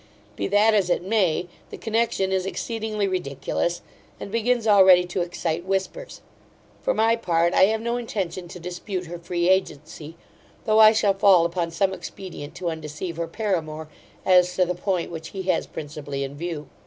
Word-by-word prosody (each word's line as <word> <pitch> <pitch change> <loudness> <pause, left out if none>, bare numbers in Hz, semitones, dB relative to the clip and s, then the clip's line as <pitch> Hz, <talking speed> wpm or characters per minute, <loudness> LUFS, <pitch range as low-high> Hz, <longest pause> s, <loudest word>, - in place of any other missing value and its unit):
Be - - -2
that 210 +2 +4
as 195 -4 +2
it 175 - +1
may, 185 -4 +1 0.2
the - - -8
connexion 225 -4 0
is 190 0 0
exceedingly 215 -1 -2
ridiculous, 170 -1 -2 0.4
and 200 - -7
begins 230 +1 +1
already 190 -4 +6
to 180 +1 -3
excite 170 -1 -2
whispers. 195 - -3 0.6
For - - 0
my 225 +1 +3
part, 170 -6 +1
I - - +6
have 220 +2 0
no 235 +1 -1
intention 185 -7 -4
to 180 +1 -10
dispute 180 +2 -5
her 175 +1 -7
free 175 0 -1
agency; 160 -4 -1 0.5
though 215 -1 +3
I 215 0 +9
shall 210 -2 +2
fall 190 -3 +5
upon 170 0 -1
some 190 +3 0
expedient 175 -6 -8
to 175 -2 -3
undeceive 160 +2 -6
her 170 0 -2
paramour, 160 -6 -3 0.4
as 180 -1 +4
to 185 - +3
the 180 - -1
point 180 -1 -2
which 160 -1 -7
he 190 - -3
has 185 -2 0
principally 145 -2 -6
in 135 +1 -6
view. 155 -2 -5
180 Hz, 175 wpm, -24 LUFS, 170-205 Hz, 0.6 s, I